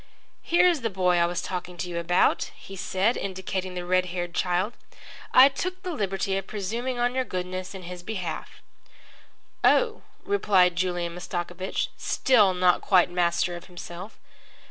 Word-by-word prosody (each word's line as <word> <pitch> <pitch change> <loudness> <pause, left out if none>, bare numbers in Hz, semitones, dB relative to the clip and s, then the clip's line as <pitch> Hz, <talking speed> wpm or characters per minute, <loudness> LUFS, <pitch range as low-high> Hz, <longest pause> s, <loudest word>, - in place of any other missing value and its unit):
"Here's 345 -3 +3
the 225 - 0
boy 180 -3 +2
I 170 0 +3
was 175 +1 -3
talking 180 -1 -5
to 180 - -3
you 170 -1 -3
about," 175 +1 +2
he 195 - -11
said, 195 +4 0
indicating 190 -1 -4
the 180 -1 -4
red 185 0 +2
haired 175 -1 -4
child. 180 +6 0 0.6
"I 260 +1 +9
took 365 +7 -4
the 365 - -3
liberty 195 -5 -1
of 195 - -10
presuming 230 +5 -3
on 245 +1 +1
your 260 0 +1
goodness 185 -2 -5
in 190 - -8
his 180 0 -7
behalf." 185 -4 -6 1.0
"Oh," 455 -3 +3 0.2
replied 195 - +3
Julian 175 -1 -1
Mastakovich, 175 +1 -3
still 210 -8 +3
not 180 -1 +3
quite 180 -2 +4
master 175 0 +1
of 170 - -9
himself. 180 +2 -9
185 Hz, 155 wpm, -26 LUFS, 175-215 Hz, 1.0 s, I